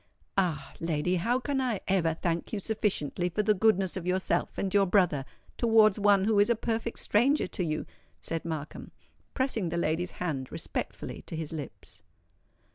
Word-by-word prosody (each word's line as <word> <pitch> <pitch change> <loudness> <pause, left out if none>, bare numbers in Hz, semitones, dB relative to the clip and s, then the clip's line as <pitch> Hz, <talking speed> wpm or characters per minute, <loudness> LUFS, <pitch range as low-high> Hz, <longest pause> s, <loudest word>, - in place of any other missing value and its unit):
"Ah! 160 -8 0
lady, 165 +2 0
how 235 +9 +1
can 270 +1 -1
I 240 -6 0
ever 170 -4 +2
thank 170 0 -2
you 215 - -2
sufficiently 190 -6 -1
for 210 +5 -1
the 215 0 +4
goodness 195 -3 +2
of 180 -2 -5
yourself 185 +1 0
and 195 -1 -2
your 200 -1 +4
brother 180 -8 +2 0.3
towards 220 -3 +5
one 200 -1 +4
who 210 0 +3
is 205 - +5
a 235 - +4
perfect 230 +1 -2
stranger 265 +8 +2
to 180 - -3
you?" 155 -2 -2 0.3
said 165 -1 -4
Markham, 155 -3 -5 0.5
pressing 245 -9 0
the 170 - -2
lady's 170 +2 -1
hand 145 -7 -3
respectfully - - -5
to - - -5
his 160 -1 -4
lips. 145 -5 -8
185 Hz, 170 wpm, -29 LUFS, 165-215 Hz, 0.5 s, towards